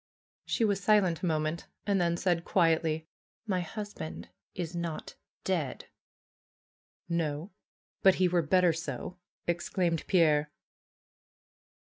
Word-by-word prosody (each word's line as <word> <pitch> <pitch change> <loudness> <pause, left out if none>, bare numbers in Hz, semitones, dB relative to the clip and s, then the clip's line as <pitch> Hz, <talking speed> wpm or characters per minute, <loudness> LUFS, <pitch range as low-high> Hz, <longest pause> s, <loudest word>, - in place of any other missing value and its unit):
She 230 - +2
was 200 -3 0
silent 190 -5 +4
a 180 - 0
moment 155 0 -1 0.2
and 200 -2 +2
then 170 0 +2
said 175 -2 +1
quietly, 160 -3 +2 0.4
^^My 185 -3 +1
husband 205 -2 -6 0.3
is 175 -1 -4
not 170 -2 -4 0.3
dead." - - -2 1.2
^^No! 165 +1 -1 0.5
But 190 -1 +6
he 185 - +3
were 175 -1 +2
better 180 +2 +4
so!" 160 +1 -5 0.3
exclaimed 175 -1 0
Pierre. 155 -5 +4
170 Hz, 110 wpm, -30 LUFS, 160-185 Hz, 1.2 s, But